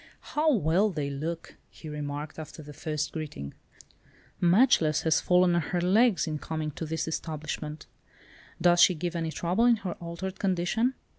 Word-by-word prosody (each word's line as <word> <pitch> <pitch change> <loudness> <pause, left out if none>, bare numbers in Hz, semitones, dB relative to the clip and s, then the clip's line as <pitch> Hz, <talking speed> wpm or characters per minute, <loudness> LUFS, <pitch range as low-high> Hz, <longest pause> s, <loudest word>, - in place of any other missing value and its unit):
"How 310 +1 +3
well 195 - +2
they 150 -6 -3
look," 160 +4 -5
he 160 - -12
remarked, 150 0 -5
after 155 0 -9
the 150 0 -10
first 150 0 -3
greeting, 145 - -6 0.9
"'Matchless' 175 - +4
has 160 -1 +3
fallen 180 0 +4
on 170 - +2
her 175 +3 -2
legs 200 +4 +3
in 155 -2 -3
coming 155 -1 -4
to 160 +2 -6
this 160 +1 -2
establishment. 155 -1 -5 0.7
Does 175 0 +5
she 185 - +6
give 175 +2 -3
any 165 -1 -1
trouble 180 +9 +1
in 240 -1 +6
her 195 -5 -5
altered 175 +3 -6
condition?" 195 +7 0
170 Hz, 160 wpm, -28 LUFS, 155-185 Hz, 0.9 s, she